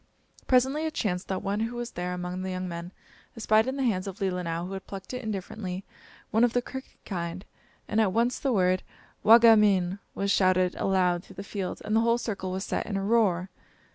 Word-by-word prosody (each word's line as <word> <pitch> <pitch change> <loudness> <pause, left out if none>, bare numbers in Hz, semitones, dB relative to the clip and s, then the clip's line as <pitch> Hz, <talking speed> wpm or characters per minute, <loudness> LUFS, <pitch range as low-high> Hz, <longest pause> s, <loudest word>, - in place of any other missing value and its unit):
Presently 265 +5 +3
it 315 - -6
chanced 180 -4 -1
that 190 - -3
one 200 +1 -1
who 230 +2 -2
was 240 0 -4
there 180 +1 -4
among 180 +1 -4
the 190 - -3
young 185 0 -3
men 170 0 -6 0.5
espied 220 0 +3
in 260 - -1
the 270 - 0
hands 200 -6 0
of 195 +2 -7
Leelinau, 180 -3 -2
who 190 - -6
had 190 - -7
plucked 195 +3 -8
it 250 - -3
indifferently, 200 -3 -5 0.5
one 225 +2 +3
of 245 -1 +3
the 245 - +2
crooked 265 +1 -9
kind, 175 0 -4 0.4
and 220 - +2
at 205 -4 +2
once 235 +4 +1
the 275 - 0
word 185 -4 +2 0.4
"Wa 225 +2 +9
ge 230 -1 +7
min!" 195 -3 +3 0.2
was 200 0 0
shouted 185 -2 +3
aloud 180 -2 +1
through - - -15
the 195 - -6
field, 200 -2 -5
and 215 - 0
the 225 - +5
whole 230 +1 +3
circle 200 -5 -4
was 190 +1 -3
set - - -2
in 200 -2 -2
a 195 - -2
roar. 195 -4 +2
195 Hz, 220 wpm, -27 LUFS, 185-225 Hz, 0.5 s, Wa